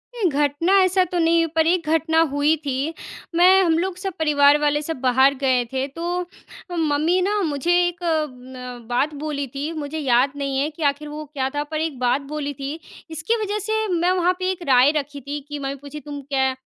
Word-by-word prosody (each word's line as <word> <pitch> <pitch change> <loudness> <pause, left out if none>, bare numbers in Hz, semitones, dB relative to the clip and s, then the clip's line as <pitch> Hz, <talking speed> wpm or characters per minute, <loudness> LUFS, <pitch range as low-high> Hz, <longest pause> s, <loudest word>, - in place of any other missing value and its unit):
नहीं, 400 -7 +1
घटना 290 +6 +1
ऐसा 370 0 +3
तो 355 - -4
नहीं, 330 0 +3
पर 320 0 +3
एक 340 -2 +1
घटना 320 0 +2
हुई 290 +2 +2
थी। 275 +4 -2 0.4
मैं 370 +3 +6
हम 330 -2 +2
लोग 370 0 -2
सब 380 0 -4
परिवार 290 -2 +5
वाले 295 0 +2
सब 320 0 -4
बाहर 265 +2 +4
गए 255 -2 +3
थे, 265 0 0
तो 345 +4 -3 0.5
मम्मी 315 +3 +2
ना 410 +2 +1
मुझे 290 +4 -1 0.2
एक 350 0 -6
अम, 280 -6 -2
अ, 250 -2 -9
बात 275 +5 0
बोली 285 -2 -2
थी, 280 +5 -5
मुझे 310 0 -5
याद 260 -1 +3
नहीं 275 -1 -2
है 290 - 0
कि 315 0 -8
आखिर 295 +2 -11
वो 305 +1 -7
क्या 265 -2 -1
था, 290 - 0
पर 310 +1 -4
एक 305 -6 -3
बात 250 +3 +1
बोली 290 -1 -3
थी। 280 +4 -6 0.3
इसकी 320 +8 -1
वजह 420 +1 -2
से 440 0 0
मैं 350 +2 +2
वहाँ 360 0 +2
पे 370 0 0
एक 360 -2 -6
राय 260 +2 +6
रखी 285 -1 -5
थी 285 +3 -5
कि 290 0 -5
मम्मी 275 0 -3
पूछी, 285 +2 -9
"तुम 290 -1 -8
क्या 265 -1 0
300 Hz, 210 wpm, -22 LUFS, 275-335 Hz, 0.5 s, मैं